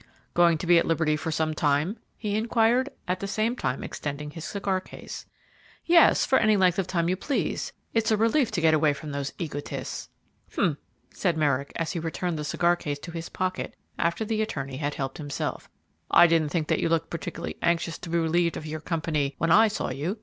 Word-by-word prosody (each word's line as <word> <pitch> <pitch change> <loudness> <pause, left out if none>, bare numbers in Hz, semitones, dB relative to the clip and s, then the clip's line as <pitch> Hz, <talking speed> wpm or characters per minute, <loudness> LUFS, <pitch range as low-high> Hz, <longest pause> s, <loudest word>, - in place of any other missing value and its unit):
"Going 170 -1 +5
to 165 - -5
be 175 0 +6
at - - -1
liberty 160 -2 +2
for 160 +1 -3
some 155 0 0
time?" 150 +6 +1 0.2
he 210 -2 -2
inquired, 230 +4 +2 0.2
at 180 +1 0
the 200 - -4
same 220 +4 0
time 130 - -2
extending 150 0 -5
his 160 +1 -8
cigar 195 -2 -1
case. - - -9 0.6
"Yes, 340 -1 +6
for 265 - +4
any 215 -2 +4
length 185 -1 +3
of 190 - 0
time 170 -3 0
you 180 - +2
please; 275 +9 -2 0.2
it's 225 -1 +2
a 220 - +3
relief 230 +4 +3
to 175 - 0
get 160 -1 +5
away 155 -1 +4
from 150 +1 -7
those 140 -1 -3
egotists." 145 -4 -5 0.4
"H'm!" 150 -4 +1 0.3
said 175 -4 0
Merrick, 140 -2 +1
as 165 -1 -2
he 175 - -3
returned 165 0 -2
the - - -3
cigar 170 +3 +2
case 145 -4 -4
to 170 +4 -9
his 165 0 -6
pocket 185 0 -3 0.2
after 170 +6 0
the 220 0 0
attorney 135 -11 -3
had 145 0 -2
helped 135 0 -4
himself; 145 -2 -4 0.4
"I - - +8
didn't 165 -3 +3
think 160 -1 -1
that - - +2
you - - +1
looked 165 0 0
particularly 165 - -5
anxious 170 0 0
to 175 - -8
be 170 - +1
relieved 170 0 +1
of 155 - -7
your 155 0 -4
company 155 -4 -1
when 165 0 +1
I 220 +5 +7
saw 210 -9 -2
you. 155 - -3
165 Hz, 210 wpm, -26 LUFS, 150-190 Hz, 0.6 s, I